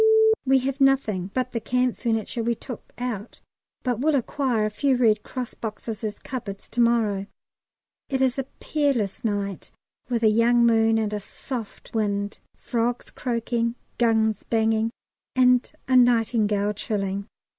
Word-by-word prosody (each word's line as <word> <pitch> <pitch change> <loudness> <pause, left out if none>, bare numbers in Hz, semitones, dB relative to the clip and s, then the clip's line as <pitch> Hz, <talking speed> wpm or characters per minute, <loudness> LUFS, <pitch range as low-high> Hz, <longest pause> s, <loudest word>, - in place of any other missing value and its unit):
We 270 0 +6
have 275 +2 -2
nothing 220 -9 +2
but 255 +2 -1
the 230 - -2
camp 250 +1 +1
furniture 230 0 -1
we 235 +1 0
took 250 +1 -9
out, 240 -3 -5 0.4
but 245 -4 0
will 300 +3 +2
acquire 255 -4 0
a 215 - -1
few 270 +5 +2
Red 220 -4 +3
Cross 250 +1 -5
boxes 220 0 -6
as 210 -1 -3
cupboards 205 -7 -6
to 240 - 0
morrow. 220 -4 +2 0.8
It 265 - 0
is 265 0 +2
a 270 - -1
peerless 275 -10 0
night 200 -4 -2 0.4
with 235 -2 0
a 220 - +6
young 235 +2 +4
moon 225 -1 +4
and 215 -1 -1
a 210 - -1
soft 225 +2 -7
wind, 205 -2 -1 0.2
frogs 240 +1 -2
croaking, 235 -1 -1 0.2
guns 220 -3 +2
banging, 225 0 +1 0.5
and 250 -1 +4 0.2
a 260 - +2
nightingale 220 -4 +3
trilling. 200 -1 -3
230 Hz, 145 wpm, -25 LUFS, 215-250 Hz, 0.8 s, We